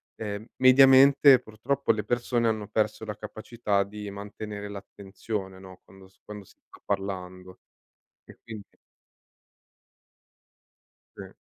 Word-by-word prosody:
ehm, 105 -1 -6
mediamente, 135 +1 +7
purtroppo, 120 +6 -2
le 105 -1 -4
persone 120 0 0
hanno 110 -2 -3
perso 110 +1 -2
la 105 -1 -6
capacità 105 -1 -3
di 105 +1 -9
mantenere 105 +1 -8
l'attenzione, 100 0 -7
no, 95 -1 -14
quando 95 0 -18
s 95 - -30
quando 105 -1 -10
si - - -24
sta - - -17
parlando 95 -1 -5 0.7
e - - -17
quindi 110 -4 -11 2.4
Sì. - - -10
105 Hz, 115 wpm, -26 LUFS, 100-115 Hz, 2.4 s, mediamente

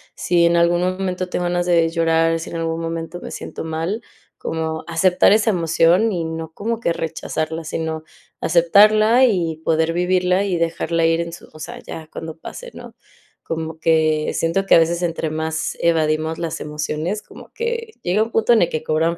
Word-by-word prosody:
si 175 -1 +2
en 170 0 +2
algún 170 +1 +3
momento 185 0 -2
tengo 180 - -2
ganas 175 0 0
de 170 -2 +4
llorar, 165 0 +2
si 165 - -7
en 170 - -4
algún 165 0 -2
momento 165 +1 -4
me - - -8
siento - - -7
mal, 165 +7 -3 0.4
como 160 -1 -3
aceptar 180 +3 +3
esa 220 +1 +3
emoción, 175 +4 +3
y 170 -2 -2
no 160 0 -5
como 225 +5 -3
que 170 - +1
rechazarla, 160 0 -3
sino 160 0 -3 0.4
aceptarla, 215 +7 +5
y 175 -9 0
poder 160 0 +1
vivirla 180 +2 +2
y 185 -3 0
dejarla 165 0 0
ir 165 +1 +2
en 170 0 -5
su 175 - -11
o 155 - -13
sea, - - -7
ya 160 -1 -9
cuando 160 0 -7
pase, - - -9
¿no? - - -11 0.5
Como 160 0 -5
que 155 -1 +2
siento 170 +4 0
que - - +6
a - - +8
veces 170 +1 +1
entre 165 -2 -1
más 160 0 -3
evadimos 160 -1 +1
las 165 -2 -3
emociones, 155 +6 -3
como - - -14
que 465 -1 -3
llega 185 +4 +1
un 225 - -7
punto 225 +1 +2
en 225 - +4
el - - +2
que 155 0 -3
cobran 160 +2 0
165 Hz, 190 wpm, -20 LUFS, 160-180 Hz, 0.5 s, a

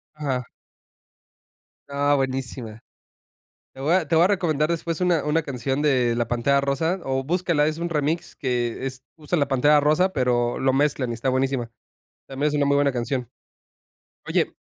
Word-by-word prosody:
Ajá. 130 -5 -3 1.4
Ah, 140 +1 +1
buenísima. 130 -4 -3 0.9
Te 135 - -11
voy 150 +5 +1
a 185 -4 +2
te 165 - 0
voy 165 - +6
a - - +6
recomendar 160 -6 +1
después 165 0 -2
una 175 -4 +2
una 155 +2 +1
canción 135 +1 -2
de 125 -5 +2
La 120 0 -1
Pantera 130 +4 +2
Rosa, 160 +7 -1
o 135 0 -1
búscala, 170 -1 +1
es 155 +1 -2
un 170 - -2
remix 160 +2 -2
que, 125 -2 -2
es 130 -1 -6
usa 155 +2 -2
la 140 -2 +1
Pantera 145 +3 +4
Rosa, 160 +6 +2
pero 120 -2 +1
lo 130 0 +2
mezclan 135 -2 +1
y 115 - -2
está 120 +4 -3
buenísima. 130 -2 0 0.6
También 135 +2 -1
es - - -4
una 145 -1 +2
muy 140 - +2
buena 140 0 +3
canción. 120 0 -2 1.0
Oye, - - 0
140 Hz, 170 wpm, -24 LUFS, 130-155 Hz, 1.4 s, voy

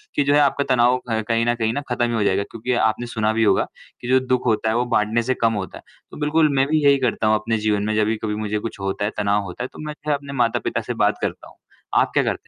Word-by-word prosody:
कि 145 - +3
जो 140 +1 +2
है 145 - +5
आपका 140 0 +2
तनाव 125 +1 +4
क 110 -1 0
कहीं 115 0 +1
न 120 - +1
कहीं 115 -1 -1 0.2
खत्म 120 0 +1
ही 120 - -2
हो 110 - +1
जायेगा 100 0 +1
क्योंकि 115 +3 -3
आपने 115 +2 -1
सुना 110 -2 0
भी 115 0 +1
होगा 100 -3 +3 0.4
कि 120 - -7
जो 130 0 +5
दुःख 130 -1 0
होता 110 -1 +1
है, 110 - 0
वो 120 +1 +1
बाटने 115 -1 +1
से 130 +2 0
कम 115 -1 +3
होता 100 -3 -5
है। - - -15 0.3
तो - - -10
बिल्कुल, 155 +1 +2
मैं 135 0 +3
भी 155 0 +1
यही 140 0 +6
करता 120 -3 0
हूँ 110 - +4
अपने 115 +2 -1
जीवन 105 -1 +1
में 110 0 -1
जब 110 +1 +1
कभी 105 -1 -1
मुझे 105 0 -2
कुछ 110 -2 -6
होता 95 +1 -2
है, 105 - -1
तनाव 100 0 +1
होता 95 +5 -6
है, 130 - -3
तो - - -12
मैं 150 - -4
फिर 150 - +1
अपने 140 0 -5
माता-पिता 115 - -1
से - - -4
बात - - +1
करता - - -4
हूँ। - - -21 0.4
आप - - 0
क्या - - +4
करते - - -3
115 Hz, 290 wpm, -21 LUFS, 105-130 Hz, 0.4 s, यही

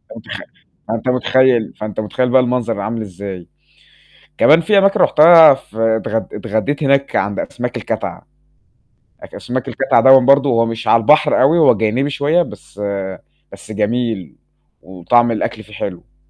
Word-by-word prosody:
أنت - - -14
خ - - -6 0.5
آه، - - -1
أنت 115 +3 -4
مُتخيّل، 125 -2 +1
فأنت 105 -1 -7
مُتخيّل 125 +4 -2
بقى 130 +1 +4
المنظر 120 -3 -2
عامل 110 +3 -4
إزاي؟ 95 -3 -9 0.9
كمان 155 +3 +4
في 205 +4 +1
أماكن 195 0 +2
رُحتها 160 -1 +6
في 120 -4 -13 0.2
اتغ 110 0 -3
اتغدّيت 115 +7 -4
هناك 140 0 0
عند 100 +1 -2
أسماك - - -5
الكَتَعَة، - - -6 1.0
أك - - -12
أسماك 125 0 -5
الكَتَعَة 135 - +1
دوًا 135 0 +7
برضه 140 +2 +3
هو 115 -2 +1
مش 115 0 -6
على 115 - +3
البحر 150 +5 +3
أوي 145 +6 +3
هو 160 - +4
جانبي 115 +6 -1
شوية، 145 +4 0
بس 105 - -10 0.7
بس - - -13
جميل 110 - -3 0.5
وطعم 95 +7 0
الأكل 110 0 -4
فيه 105 - -18
حلو. 90 -4 -8
120 Hz, 155 wpm, -16 LUFS, 110-140 Hz, 1.0 s, دوًا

